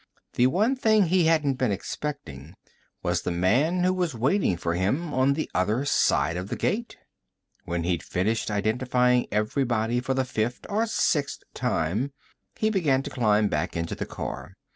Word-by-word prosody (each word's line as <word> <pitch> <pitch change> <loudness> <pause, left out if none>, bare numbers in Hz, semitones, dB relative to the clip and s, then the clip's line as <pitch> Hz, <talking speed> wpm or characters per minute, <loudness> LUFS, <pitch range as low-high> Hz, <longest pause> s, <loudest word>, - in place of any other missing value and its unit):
The 125 - +4
one 215 - +2
thing 220 -5 +3
he 180 0 +2
hadn't 150 -5 +2
been 125 -5 +1
expecting 90 - -6 0.5
was 90 -1 0
the - - -3
man 125 - +2
who 185 +1 +3
was 175 -7 -1
waiting 130 - +1
for 85 0 -2
him 135 - -1
on 130 +2 +3
the 155 +2 -2
other 105 +9 0
side 85 -10 +2
of 90 +2 -5
the - - -2
gate. 230 +2 -2 0.7
When 85 -1 -2
he'd 85 -1 0
finished 105 +6 -1
identifying 125 +4 +1
everybody 115 +1 0
for 130 +1 -2
the 130 0 +1
fifth 120 -1 -2
or 220 +3 0
sixth 145 -9 0
time, 105 - -1 0.4
he 215 0 +1
began 145 -10 +2
to - - -6
climb 110 -4 +2
back 80 0 -2
into 85 0 -3
the - - -5
car. - - -6
125 Hz, 165 wpm, -26 LUFS, 95-155 Hz, 0.7 s, The